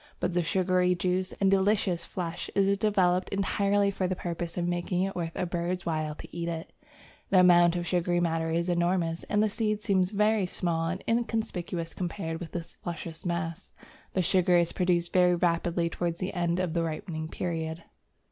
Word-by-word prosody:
But 180 0 -1
the 175 - +2
sugary 180 +1 +2
juice 185 +1 0
and 195 -1 +2
delicious 195 -2 +2
flesh 175 -2 -4
is 200 0 +3
developed 185 -4 +2
entirely 200 0 +1
for 190 -1 -1
the 185 - -1
purpose 170 -1 -4
of 175 -1 0
making 175 +1 0
it 195 0 -2
worth 165 -2 -3
a 180 - -1
bird's 175 +1 -2
while 155 -2 -1
to - - -11
eat 170 0 -2
it. 165 -1 -5 0.6
The 185 -2 +6
amount 175 -1 +6
of 175 -1 -2
sugary 175 0 +1
matter 165 -1 0
is 170 +2 0
enormous, 175 -1 +1
and 210 0 +2
the - - +3
seeds 210 0 -1
seem 190 -2 +3
very 210 0 +2
small 165 -2 -1
and 185 +3 -3
inconspicuous 220 -7 -1
compared 165 -2 -4
with 175 - -7
this 170 -1 -6
luscious 165 0 -6
mass. 170 +1 -3 0.4
The 185 - +1
sugar 180 +1 +3
is 170 -1 +2
produced 175 -2 +1
very 180 -1 +5
rapidly 170 0 +1
towards 170 0 -2
the 185 - -3
end 175 -1 0
of 180 -3 -1
the 170 - +1
ripening 160 0 -4
period. 165 -1 -4
175 Hz, 185 wpm, -28 LUFS, 170-185 Hz, 0.6 s, The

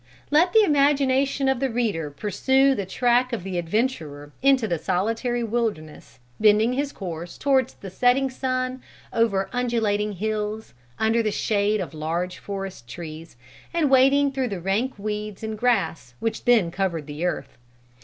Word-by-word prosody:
"Let 335 +5 +4
the 440 +3 +6
imagination 275 -3 +2
of 265 -2 +2
the 270 0 0
reader 215 -10 -1
pursue 265 - +2
the 200 -7 -3
track 245 +4 +2
of 230 -7 -3
the 185 -2 -3
adventurer 165 - -2
into 265 -4 +4
the 170 -5 -1
solitary 230 - -1
wilderness, 215 - -3 0.2
bending 215 +3 +4
his 280 +2 -1
course 175 - -7
towards 265 -3 +1
the 195 - -9
setting 250 +6 +3
sun 255 0 -2 0.3
over 200 -4 +1
undulating 220 -4 0
hills, 215 +2 -3 0.2
under 225 +1 +2
the 215 - 0
shade 210 0 +1
of 180 -3 -5
large 170 +4 -3
forest 195 -10 -6
trees, 160 +3 -9 0.4
and 310 -5 +2
wading 275 +2 +5
through 265 -1 -1
the 195 -3 -4
rank 200 +9 -1
weeds 210 0 -5
and 220 -1 -4
grass 165 - 0
which 225 - -3
then 225 -9 +4
covered 170 -4 -2
the 150 +2 -6
earth. 140 -8 -3
220 Hz, 155 wpm, -24 LUFS, 185-255 Hz, 0.4 s, the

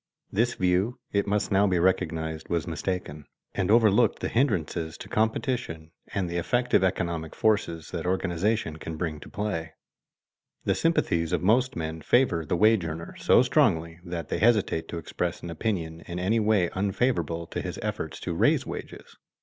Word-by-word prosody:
This 120 +4 +1
view, 95 +7 +1
it 100 0 +1
must 105 +1 0
now 100 +1 +4
be 90 -2 +2
recognized, 80 -3 0
was 85 -3 0
mistaken, 80 -3 -4 0.3
and 95 - -1
overlooked 110 0 +4
the - - -3
hindrances 85 - 0
to - - -9
competition 110 - -1 0.2
and 95 -3 -1
the 85 0 -3
effective 120 +6 +2
economic 85 -4 -1
forces 90 -7 0
that 85 -1 -3
organization 95 -1 0
can 80 0 -6
bring 80 -2 -2
into - - -12
play. 95 -6 -3 0.9
The - - +3
sympathies 85 - +1
of - - 0
most 125 +6 +3
men 80 0 -4
favor 120 -9 +2
the 85 - 0
wage 110 0 +4
earner 80 0 -5
so - - +5
strongly 80 +1 +2
that 85 -3 -5
they - - -1
hesitate 105 -6 +2
to 85 - -5
express 85 +1 -3
an 85 - -5
opinion 85 -2 -3
in 85 - -5
any 100 +6 +1
way 105 -5 +2
unfavorable 95 - 0
to - - -4
his - - -5
efforts - - -4
to - - -3
raise - - +3
wages. - - -8
90 Hz, 165 wpm, -27 LUFS, 80-105 Hz, 0.9 s, so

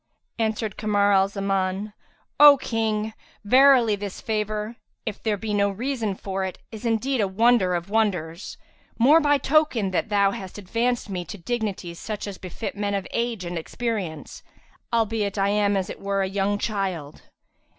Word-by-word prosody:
Answered 220 -1 -1
Kamar 205 -1 +2
al 195 -1 +4
Zaman, 195 0 -2 0.5
"O 290 -1 +10
King, 220 -3 -1 0.3
verily 250 -1 +6
this 200 -1 -6
favour, 215 +1 -2 0.3
if 215 -3 -5
there 215 -2 0
be 215 +1 -4
no 200 0 +2
reason 225 -1 -2
for 190 0 -4
it, 190 -1 -4
is 225 +1 -5
indeed 230 +3 +1
a 200 - +2
wonder 200 -2 +3
of 175 +1 -3
wonders, 185 -6 -1 0.4
more 280 +8 +6
by 290 -1 +4
token 265 -8 +2
that 185 - -1
thou 200 -1 +3
hast 190 -1 -7
advanced 230 +5 -1
me 185 -3 -4
to 205 - -8
dignities 195 -4 -4
such 215 -2 -5
as 200 -2 -7
befit 190 +3 -6
men 200 0 -1
of 195 -1 -2
age 235 -5 -2
and 175 -1 -3
experience, 190 -4 -4 0.5
albeit 220 -3 0
I 195 0 +2
am 205 -1 +2
as 190 -1 -1
it - - -8
were 195 0 0
a - - -1
young 200 +1 0
child." 190 -9 -3
205 Hz, 165 wpm, -24 LUFS, 195-225 Hz, 0.5 s, O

